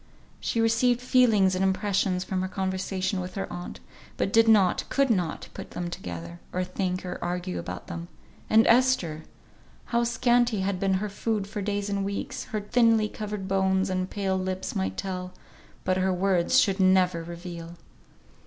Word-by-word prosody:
She 230 - -1
received 230 +2 +3
feelings 230 -7 +4
and 185 +1 0
impressions 190 -1 +1
from 185 -1 -2
her 185 - -1
conversation 190 0 -2
with 180 0 -7
her 195 - -2
aunt, 175 0 -7 0.4
but 195 - -1
did 225 0 +6
not, 205 -5 +4
could 275 -2 +2
not, 180 -7 -1
put - - -8
them 175 -1 -5
together, 85 - -7
or 185 - -1
think 185 0 -3
or 180 - -5
argue 180 +1 -3
about - - -6
them. 170 0 -6 0.4
And 220 +1 +6
Esther! 230 -11 +3 0.7
How 235 0 +3
scanty 240 -2 +2
had 190 -1 -1
been 195 0 +2
her 205 +3 -1
food 210 0 -2
for 205 +1 -5
days 205 0 -2
and 200 -1 -1
weeks, 200 0 -4
her 215 -1 -3
thinly 225 0 +3
covered 210 -3 -5
bones 190 0 +1
and 185 0 -1
pale 190 -2 -1
lips 185 0 -3
might 95 0 -2
tell, 185 -1 -4 0.5
but 185 0 +1
her 190 0 +2
words 185 +5 +3
should 195 -5 +2
never 185 -2 +4
reveal! 170 0 -8
190 Hz, 170 wpm, -27 LUFS, 180-210 Hz, 0.7 s, did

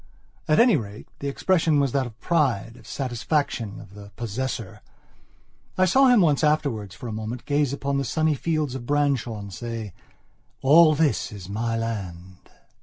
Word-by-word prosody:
At 155 - +3
any 235 -6 +6
rate, 105 -2 -8
the 140 - -4
expression 160 +1 +2
was 140 -2 +1
that 135 -1 0
of 110 -2 -14
pride, 125 -10 0
of - - -16
satisfaction, 125 -4 -2
of 100 -3 -13
the 100 0 -11
possessor. 115 -2 -4 1.0
I 185 - +4
saw 265 +9 +5
him 245 -4 +6
once 150 -4 +2
afterwards, 140 -11 0
for 125 - -8
a - - -4
moment, 110 +3 -5
gaze 145 -2 +1
upon 140 0 -2
the - - -1
sunny 155 +5 +1
fields 155 -1 -1
of 125 -2 -7
Branshaw 140 -6 0
and 100 -2 -8
say: 115 -1 -6 0.7
"All 155 +3 +7
this 150 -1 +1
is 100 -4 -9
my 115 +2 -2
land!" 95 -5 -6
130 Hz, 170 wpm, -24 LUFS, 110-150 Hz, 1.0 s, All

